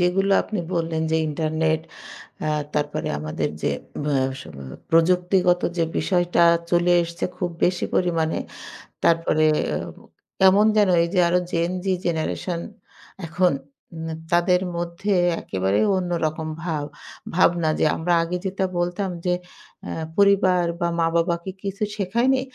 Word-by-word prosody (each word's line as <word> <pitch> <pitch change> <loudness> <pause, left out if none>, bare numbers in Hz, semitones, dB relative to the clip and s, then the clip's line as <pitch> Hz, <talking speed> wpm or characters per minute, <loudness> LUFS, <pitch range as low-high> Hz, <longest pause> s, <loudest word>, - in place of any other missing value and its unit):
যেগুলো 195 +3 +2
আপনি 210 -4 -4
বললেন। 165 -1 -1
যে, 160 - +2
ইন্টারনেট 155 +1 0 0.7
আ - - 0 0.3
তারপরে 150 -1 -1
আমাদের 75 0 -2
যে - - +1 0.3
আব - - -4
আ - - +3 0.2
স - - -8 0.5
প্রযুক্তিগত 180 +2 +3 0.2
যে 165 - +3
বিষয়টা 175 -2 +2 0.3
চলে 175 0 +3
এসছে 170 0 -5
খুব 180 - -2
বেশি 180 0 +1
পরিমাণে। 165 -3 +1 0.7
তারপরে 165 -2 +3 0.3
এ - - 0 0.3
ও - - -19 0.4
কেমন 190 +2 +6
যেন 205 -2 +4
এই - - 0
যে 185 - +2
আরো 180 +1 +3
Gen 170 +1 0
Z - - -12 0.2
জেনারেশন 170 +1 -2 0.7
এখন 175 +2 +2 0.5
ন - - -4 0.2
তাদের 175 +1 +3 0.2
মধ্যে 175 +4 -2 0.3
একেবারে 95 +1 0 0.2
অন্যরকম 165 -3 -2 0.2
ভাব 155 -4 -2 0.5
ভাবনা 170 -2 +3
যে - - +3
আমরা 175 +2 0
আগে 175 +2 -2
যেটা 190 0 -1
বলতাম 180 +3 -1 0.2
যে, 180 - +2 0.5
"আ - - -5 0.3
পরিবার 195 -3 +4 0.2
বা 170 - +2
মা-বাবা 165 +1 +2
কি 190 - -5
কিছু 200 +2 -3
শেখায়নি?" 235 +7 +1
175 Hz, 140 wpm, -23 LUFS, 165-185 Hz, 0.7 s, কেমন